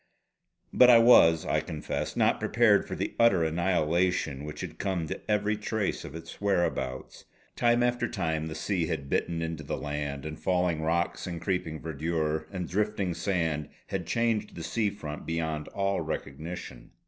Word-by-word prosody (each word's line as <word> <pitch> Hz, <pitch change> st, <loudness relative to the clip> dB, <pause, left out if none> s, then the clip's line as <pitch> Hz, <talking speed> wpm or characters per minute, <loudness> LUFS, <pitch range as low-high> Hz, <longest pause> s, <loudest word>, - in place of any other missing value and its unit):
But 125 Hz, -, +7 dB
I 120 Hz, -, +9 dB
was, 85 Hz, -9 st, +6 dB
I -, -, +1 dB
confess, 75 Hz, -, -4 dB
not -, -, +3 dB
prepared -, -, +3 dB
for -, -, -4 dB
the -, -, -3 dB
utter 115 Hz, -8 st, +5 dB
annihilation 85 Hz, -3 st, +1 dB
which 75 Hz, 0 st, -7 dB
had -, -, -7 dB
come 95 Hz, -4 st, -1 dB
to -, -, -5 dB
every 105 Hz, 0 st, +2 dB
trace 105 Hz, -1 st, -2 dB
of 70 Hz, -, -8 dB
its 80 Hz, +3 st, -9 dB
whereabouts. 85 Hz, -10 st, -1 dB, 0.3 s
Time 120 Hz, 0 st, +3 dB
after 120 Hz, 0 st, +1 dB
time 80 Hz, -6 st, -2 dB
the 80 Hz, -, -6 dB
sea 90 Hz, -1 st, -1 dB
had 70 Hz, -5 st, -4 dB
bitten 85 Hz, -1 st, 0 dB
into 80 Hz, -1 st, -4 dB
the 75 Hz, -, -4 dB
land; 75 Hz, -1 st, -4 dB
and 80 Hz, 0 st, -6 dB
falling 90 Hz, -3 st, +1 dB
rocks, 85 Hz, +3 st, -1 dB
and 85 Hz, -2 st, -4 dB
creeping 85 Hz, -2 st, -2 dB
verdure, 80 Hz, 0 st, -2 dB
and 90 Hz, -3 st, -4 dB
drifting 100 Hz, -2 st, 0 dB
sand 80 Hz, -4 st, -1 dB, 0.2 s
had -, -, -3 dB
changed 115 Hz, -2 st, 0 dB
the 85 Hz, -, -6 dB
sea 110 Hz, +4 st, 0 dB
front 75 Hz, -7 st, -7 dB
beyond 80 Hz, -2 st, -2 dB
all 100 Hz, 0 st, -1 dB
recognition. 70 Hz, -4 st, -6 dB
85 Hz, 165 wpm, -28 LUFS, 80-100 Hz, 0.3 s, I